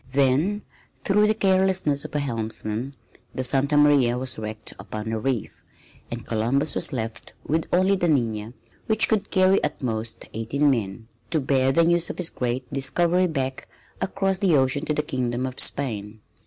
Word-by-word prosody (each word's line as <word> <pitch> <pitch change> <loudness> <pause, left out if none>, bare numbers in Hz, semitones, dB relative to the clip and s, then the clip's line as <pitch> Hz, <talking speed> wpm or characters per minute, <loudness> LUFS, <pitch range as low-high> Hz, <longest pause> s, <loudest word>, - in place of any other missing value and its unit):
Then, 140 +10 +2 0.4
through 210 +1 +3
the 215 - +2
carelessness 190 -7 +2
of - - -8
a - - +2
helmsman, 115 0 -4 0.4
the 130 - -2
Santa 140 +3 +2
Maria 140 -5 +4
was 130 -2 -3
wrecked 110 0 -6
upon 110 +1 -5
a 110 - -1
reef, 125 -1 -3 0.5
and 120 -1 -6
Columbus 120 +7 0
was - - 0
left 115 -3 -5
with 160 +2 0
only 190 +2 +3
the 175 -2 0
Nina, 115 -7 0 0.3
which 220 0 +3
could 215 -3 0
carry 185 +1 +3
at 150 - -2
most 115 -3 -3
eighteen 135 +7 +1
men, 110 -3 -3 0.2
to 160 - +1
bear 135 -1 +2
the 170 +5 +4
news 170 0 +2
of - - -5
his 180 -2 -1
great 125 +1 -2
discovery 170 +7 +2
back 135 -5 -3 0.3
across 195 -1 0
the 185 -7 +4
ocean 135 +3 +1
to 150 - 0
the 150 - 0
Kingdom 125 -3 -2
of 130 -1 -6
Spain. 110 -6 0
135 Hz, 170 wpm, -24 LUFS, 120-170 Hz, 0.5 s, Maria